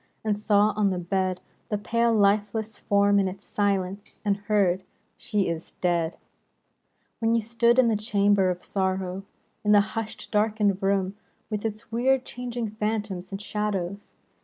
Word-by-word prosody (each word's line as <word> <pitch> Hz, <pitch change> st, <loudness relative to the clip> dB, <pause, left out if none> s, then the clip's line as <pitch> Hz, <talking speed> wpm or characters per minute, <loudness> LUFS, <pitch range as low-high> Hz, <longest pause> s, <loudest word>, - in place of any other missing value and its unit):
And 210 Hz, -2 st, 0 dB
saw 210 Hz, 0 st, +3 dB
on 210 Hz, -1 st, +2 dB
the 185 Hz, -2 st, 0 dB
bed 185 Hz, +1 st, -1 dB, 0.3 s
The 210 Hz, -, -1 dB
pale, 230 Hz, +3 st, +1 dB
lifeless 210 Hz, +1 st, +1 dB
form 200 Hz, 0 st, +3 dB
in 195 Hz, -, +2 dB
its 190 Hz, +2 st, -7 dB
silence, 200 Hz, -1 st, -1 dB
And 200 Hz, -1 st, +2 dB
heard, 200 Hz, -3 st, +1 dB, 0.2 s
" -, -, -43 dB
She 205 Hz, -2 st, -1 dB
is 165 Hz, -1 st, -4 dB
dead," 170 Hz, -2 st, 0 dB, 0.5 s
— -, -, -46 dB
When 230 Hz, 0 st, +2 dB
you 230 Hz, -, +2 dB
stood 235 Hz, +2 st, +2 dB
in 255 Hz, -2 st, +6 dB
the 225 Hz, -, +2 dB
chamber 205 Hz, -2 st, +2 dB
of 180 Hz, 0 st, -3 dB
sorrow. 190 Hz, -1 st, -1 dB, 0.4 s
In 210 Hz, 0 st, +4 dB
the 205 Hz, -, +7 dB
hushed, 225 Hz, -1 st, -5 dB
darkened 210 Hz, -2 st, +2 dB
room, 195 Hz, 0 st, 0 dB, 0.3 s
With 210 Hz, 0 st, -2 dB
its 220 Hz, +1 st, -5 dB
weird 255 Hz, +3 st, +2 dB
changing 240 Hz, -3 st, -4 dB
phantoms 210 Hz, -4 st, -3 dB
and 195 Hz, -, -4 dB
shadows. 205 Hz, -2 st, -3 dB
205 Hz, 160 wpm, -26 LUFS, 195-215 Hz, 0.5 s, the